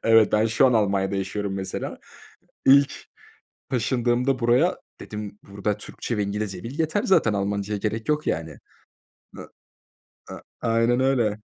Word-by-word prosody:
Evet, 115 -2 +5
ben 110 +1 +3
şu 115 +4 +4
an 125 - +3
Almanya'da 100 -3 +1
yaşıyorum 95 +1 -3
mesela. 95 -1 -5 0.7
İlk 140 +1 +5 0.7
taşındığımda 125 +1 +1
buraya 120 +1 +3 0.2
dedim, 105 -1 -7
"Burada 100 +1 -2
Türkçe 115 +2 -5
ve 105 - +1
İngilizce 100 -2 -4
bil 130 +7 -7
yeter 160 +6 0
zaten, 115 - +3
Almanca'ya 100 +1 -2
gerek 110 +5 -3
yok 150 0 0
yani." 80 -2 -2 0.8
A - - -7 0.9
a - - -8 0.2
aynen 115 +2 +2
öyle! 120 -6 +1
110 Hz, 135 wpm, -24 LUFS, 100-125 Hz, 0.9 s, Evet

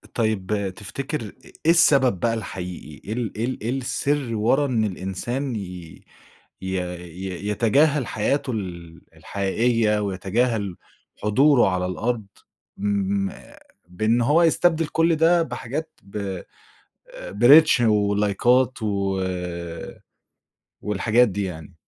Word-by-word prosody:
طيب 105 -3 -1
تفتكر 135 +7 -5
إ 105 -3 -7 0.3
إيه 165 - +6
السبب 140 - +4
بقى 115 +3 +1
الحقيقي؟ 90 - -7
إيه - - -1
ال 120 -3 -3
إيه 115 - 0
ال 130 - -4
إيه 110 - -3
السِر 135 0 -1
ورا 120 +7 +2
إن 120 -5 0
الإنسان 110 +7 -3
ي - - -2 1.0
ي 95 0 -2 0.2
ي 90 +3 -6
يتجاهل 135 +6 +2
حياته 135 +6 -1
ال 85 -6 -6 0.2
الحقيقية 105 +2 0
ويتجاهل 100 +1 -1 0.5
حضوره 130 +3 +4
على 90 -1 -1
الأرض 110 +3 -2 0.5
ما 100 -1 -2 0.3
بإن 110 +7 +1
هو 150 +8 +4
يستبدل 165 -1 +3
كل 165 +1 +2
ده 165 +2 +4
بحاجات 140 +3 -5
ب 100 +2 -12
آآ 95 -3 -6 0.7
بreach 135 +6 +7
ولايكات 105 +4 +2
و 100 -2 -1 1.6
والحاجات 110 +4 +2
دي 100 0 -3
يعني؟ 85 -2 -7
110 Hz, 115 wpm, -23 LUFS, 95-130 Hz, 1.6 s, بreach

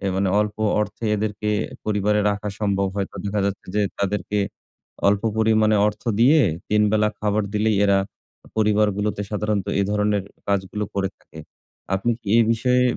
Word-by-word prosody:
অ্যা 100 - -1
মানে 95 0 +1
অল্প 105 0 -2 0.2
অর্থে 105 +2 -4
এদেরকে 105 0 -2 0.3
পরিবারে 105 0 +1
রাখা 105 +1 -3
সম্ভব 100 -2 +1
হয়তো 100 -1 -3
দেখা 100 0 -1
যাচ্ছে 100 0 -3
যে 105 - +2 0.2
তাদেরকে 105 +1 -1 0.7
অল্প 100 0 +2 0.2
পরিমাণে 110 -1 +3
অর্থ 105 - -3 0.2
দিয়ে, 145 +6 +6 0.3
৩ 105 0 +3
বেলা 105 0 +3
খাবার 105 0 +1
দিলেই 105 0 +2
এরা 100 -1 +4 0.6
পরিবারগুলোতে 105 -1 +1
সাধারণত 105 -2 -1
এ - - +3
ধরনের 105 -1 +1 0.3
কাজগুলো 100 +1 -1
করে 95 -1 0
থাকে। 80 - -16 0.6
আপনি 100 +5 0
কি - - -8
এ - - +7
বিষয়ে 125 +2 +2
105 Hz, 155 wpm, -22 LUFS, 100-105 Hz, 0.7 s, এ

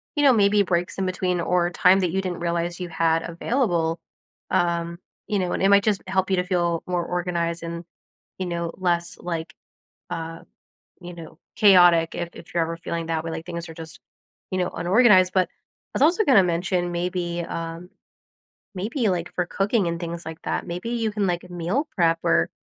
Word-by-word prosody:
you 290 - +1
know, 270 -3 +7
maybe 205 -1 +4
breaks 175 -1 -1
in 190 - -1
between 180 -1 -1
or 175 0 +1
time 185 +2 +4
that 180 -2 +1
you 190 +1 0
didn't 180 -2 -4
realize 170 +1 -2
you 180 -1 -5
had 165 0 +1
available. 170 -4 0 0.5
Um, 170 0 0 0.3
you 205 -2 0
know, 180 -1 -1
and - - -2
it 195 - +5
might 200 0 +6
just 210 -3 +1
help 190 0 0
you - - +4
to 180 - +2
feel 175 -2 0
more 175 -1 -1
organized 170 -1 -2
and, 170 0 -6 0.5
you 185 - -2
know, 170 -1 -2
less, 175 -2 -1
like, 165 -2 -4 0.6
uh, 165 0 -5 0.6
you 175 0 -8
know, 165 -1 -11 0.2
chaotic 175 -5 +6
if 175 0 -4
if 165 - -13
you're 170 - +2
ever 165 +1 -2
feeling 170 0 -4
that 160 -1 -1
way, 165 - -4
like 160 +1 -6
things 170 -1 -5
are 165 - -9
just, 160 -1 -10 0.5
you 185 - -1
know, 180 - 0
unorganized, 185 0 +4
but 185 -1 +3
I - - -11
was - - +1
also 350 +8 +4
gonna 245 - +6
mention 175 +1 0
maybe, 175 -1 -2
um, 165 +2 -6 0.9
maybe, 220 +4 -1
like, 175 -2 -2
for 180 - 0
cooking 195 +1 0
and 170 0 -2
things 170 0 -5
like 160 0 -8
that, - - -2
maybe 180 +6 -4
you 225 -2 -1
can, 205 -2 0
like, 175 0 -2
meal 180 - -1
prep 165 -3 +3
or - - +3
175 Hz, 195 wpm, -24 LUFS, 170-190 Hz, 0.9 s, know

